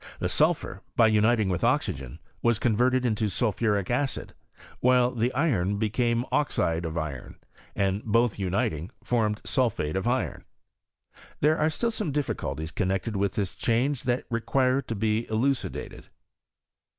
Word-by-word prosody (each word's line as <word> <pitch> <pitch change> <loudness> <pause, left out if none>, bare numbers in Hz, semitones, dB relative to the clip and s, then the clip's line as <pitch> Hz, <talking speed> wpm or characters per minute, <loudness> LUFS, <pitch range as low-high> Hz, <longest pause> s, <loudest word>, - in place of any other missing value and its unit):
The - - -2
sulphur, - - +1
by 115 - +6
uniting 110 0 +3
with 90 -2 -1
oxygen, 65 -2 0 0.2
was 120 -2 +3
converted 125 +3 +2
into 110 -2 +1
sulphuric 105 0 0
acid, 135 +2 -1 0.5
while 125 0 +4
the 120 0 0
iron 105 - +1
became 115 +3 0
oxide 85 - +1
of 80 +1 -5
iron, 75 -6 -5 0.4
ana 100 +1 0
both 115 -1 +2
uniting, 90 -3 -1
formed 110 -3 0
sulphate 115 - 0
of 95 +4 -1
iron. 130 +2 -1 1.0
There 155 +2 +3
are 155 +1 +3
still 230 +9 -1
some 210 -8 -3
difGculties 80 - -3
connected 95 +4 -1
with 100 -1 0
this 100 -4 -1
change 125 +4 0
that 125 0 0
require 130 +3 +1
to 115 - -5
be 110 +2 0
elucidated. 130 +5 -2
115 Hz, 140 wpm, -27 LUFS, 95-125 Hz, 1.0 s, by